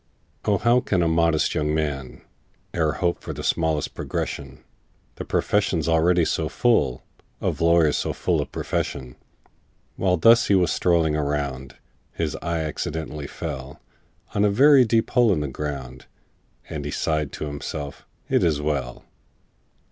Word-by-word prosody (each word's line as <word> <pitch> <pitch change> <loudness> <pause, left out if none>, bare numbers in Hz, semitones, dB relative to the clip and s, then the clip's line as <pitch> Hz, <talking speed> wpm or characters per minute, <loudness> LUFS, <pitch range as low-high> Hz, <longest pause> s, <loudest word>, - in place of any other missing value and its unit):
"O, 105 -1 +3
how 120 +5 +3
can 95 -7 0
a - - +2
modest 80 -1 +2
young 75 0 0
man 70 -5 -3 0.5
E'er 80 -3 +1
hope 85 0 -1
for - - -6
the - - -7
smallest 80 -3 0
progression,— 65 -1 -5 0.5
The - - -5
profession's 95 -6 0
already 85 +1 +3
so 80 0 -1
full 115 - +1 0.4
Of - - -2
lawyers 85 -2 +4
so - - -1
full - - 0
of - - -6
profession!" 60 -2 -3 0.8
While 90 -2 +2
thus 115 +8 +5
he 100 - +4
was 90 -2 +3
strolling 85 -3 +2
around, 70 -3 -3 0.4
His - - -2
eye 85 -1 -2
accidentally 75 -1 -4
fell 65 0 -7 0.5
On 100 - +1
a 105 - +4
very 135 +5 +6
deep 115 0 +1
hole 120 -3 +4
in 80 -6 +1
the 75 - -2
ground, 65 -2 -6 0.6
And 75 -2 -5
he 75 - -4
sighed 75 -1 -1
to - - -4
himself, 70 0 -6 0.2
"It - - +2
is 80 -4 +2
well!" 70 -5 -3
80 Hz, 150 wpm, -24 LUFS, 75-90 Hz, 0.8 s, very